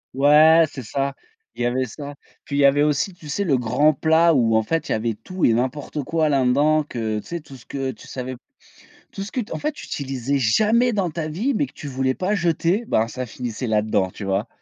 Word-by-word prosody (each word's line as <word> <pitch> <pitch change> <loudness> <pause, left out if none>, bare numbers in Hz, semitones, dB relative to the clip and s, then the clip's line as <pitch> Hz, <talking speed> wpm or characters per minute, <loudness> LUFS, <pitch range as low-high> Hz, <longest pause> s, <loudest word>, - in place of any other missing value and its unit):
Ouais, 155 +4 +6
c'est 130 - -7
ça, 135 +5 -2 0.4
il - - -6
y - - +1
avait 130 +2 0
ça. 145 +4 -8 0.3
Puis 140 - -5
il - - +2
y 140 - +5
avait 140 +1 +4
aussi, 150 +5 0
tu 155 -4 -13
sais? 200 +8 -1
Le 140 -8 +2
grand 125 +6 +2
plat 160 +3 +3
où 115 -4 +3
en 110 - +3
fait 165 +8 -2
il - - -2
y - - +2
avait 115 +1 -1
tout 180 - -3
et 115 - +4
n'importe 130 +4 -2
quoi 160 +1 0
là 135 -3 +2
dedans, 150 +4 +3
que 110 -6 -3
tu - - -12
sais, 170 0 -4
tout 135 - -13
ce 125 - -15
que 135 -1 -3
tu 110 - -14
savais 130 0 -5
p 120 - -20 0.7
tout 195 - -5
ce 200 - -6
que 255 - -2
t 215 - -7
en - - -3
fait 300 - -1
tu - - -10
utilisais 135 0 -2
jamais 220 - +3
dans 190 -5 0
ta 155 -1 -4
vie, 220 - -1
mais 290 - +1
que - - -18
tu 150 - -9
voulais 130 -1 -1
pas 190 +3 -1
jeter, 175 +4 +1
ben, 110 +1 +2
ça 130 +2 -5
finissait 120 +1 -5
là-dedans, 105 -3 +1
tu 100 - -8
vois? 95 +2 -1
140 Hz, 255 wpm, -22 LUFS, 125-165 Hz, 0.7 s, Ouais